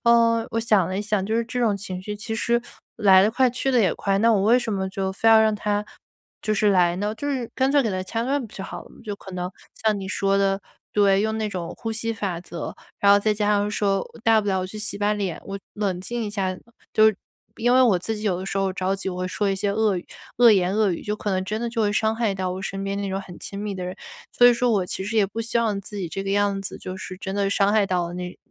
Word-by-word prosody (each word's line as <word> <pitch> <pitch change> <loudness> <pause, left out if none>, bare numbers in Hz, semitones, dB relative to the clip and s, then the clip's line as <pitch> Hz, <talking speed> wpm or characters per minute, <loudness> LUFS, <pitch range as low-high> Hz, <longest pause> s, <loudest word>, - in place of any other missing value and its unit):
呃， 230 -1 +4
我 230 - +1
想 210 -6 +3
了 185 - -3
一 - - -1
想， 210 -2 0
就 220 - -1
是 230 +1 +1
这 250 +2 -5
种 220 -4 +2
情 185 -2 -6
绪 210 +3 -5
其 225 +2 -5
实 235 +1 +1 0.4
来 195 -4 +6
得 210 - +3
快 255 +2 +3
去 255 +2 -1
得 250 - +4
也 190 -6 +3
快， 195 -1 0
那 230 +3 +4
我 200 -3 +2
为 230 +5 +5
什 230 -3 -3
么 190 -1 -1
就 190 0 -2
非 225 +4 +2
要 225 -1 +8
让 220 0 +4
它 210 0 -1 0.6
就 215 - 0
是 210 0 +3
来 175 -3 +4
呢， 205 +3 -1
就 285 - -4
是 255 -5 -2
干 265 0 +2
脆 285 -1 +5
给 225 - -1
它 185 -1 -2
掐 225 +4 -2
断 275 +4 0
不 215 - -19
就 190 - -6
好 - - -7
了 - - -17
嘛。 - - -17
就 205 - -4
可 190 - -11
能， 180 0 -3 0.2
像 215 -2 0
你 195 - -5
说 195 0 +1
的 195 0 +1 0.3
对， 200 -2 +4
用 220 +1 0
那 215 -1 -1
种 175 -3 -5
呼 225 -1 -4
吸 230 +1 -2
法 190 -6 -3
则， 170 -2 -6 0.2
然 200 0 +6
后 205 - +6
再 215 +1 +1
加 210 0 0
上 205 0 +2
说 200 -2 0 0.2
大 225 -1 +5
不 205 - -4
了 190 - +1
我 185 - -3
去 215 +3 -8
洗 210 -1 -3
把 205 +1 +2
脸， 195 -6 -3
我 195 0 -5 0.2
冷 195 -4 -1
静 235 +4 -3
一 210 - -4
下。 190 -3 -2 0.4
就 215 - +6
是 215 -2 +3 0.4
因 240 +2 +2
为 260 - +6
我 230 -7 +5
自 220 +5 -3
己 210 - -7
有 190 -5 0
的 - - -5
时 195 - -2
候 195 -1 0
着 190 +1 -1
急， 195 - -4
我 180 -1 -4
会 185 0 -2
说 200 +2 -1
一 195 - +1
些 200 +1 -1
恶 210 -1 +2
语 175 - -5 0.3
恶 240 -1 +8
言 190 -2 +3
恶 215 -2 +3
语， 170 - -3
就 210 - -2
可 210 -1 -3
能 185 -1 0
真 215 +3 -3
的 235 - -1
就 230 0 -2
会 205 -1 +1
伤 220 +1 +1
害 225 -4 0
到 185 -1 -2
我 185 +1 -4
身 195 0 -4
边 195 0 -2
那 200 - -2
种 190 0 -2
很 180 -3 -11
亲 200 - -8
密 210 0 -3
的 185 - -5
人。 180 +1 -5 0.4
所 245 - +4
以 - - +6
说 245 +1 +1
我 200 -4 +2
其 185 +1 -5
实 220 +3 -3
也 210 - +5
不 220 +4 -5
希 230 +1 0
望 215 -4 0
自 205 +1 -9
己 185 -4 -3
这 195 +4 -5
个 195 - -2
样 200 0 +1
子 195 - -6
就 185 - -6
是 185 0 -7
真 190 +1 -5
的 200 -1 +1
伤 200 0 +2
害 210 -2 +3
到 175 -2 -1
那 180 0 -6
205 Hz, 315 characters per minute, -24 LUFS, 190-220 Hz, 0.6 s, 要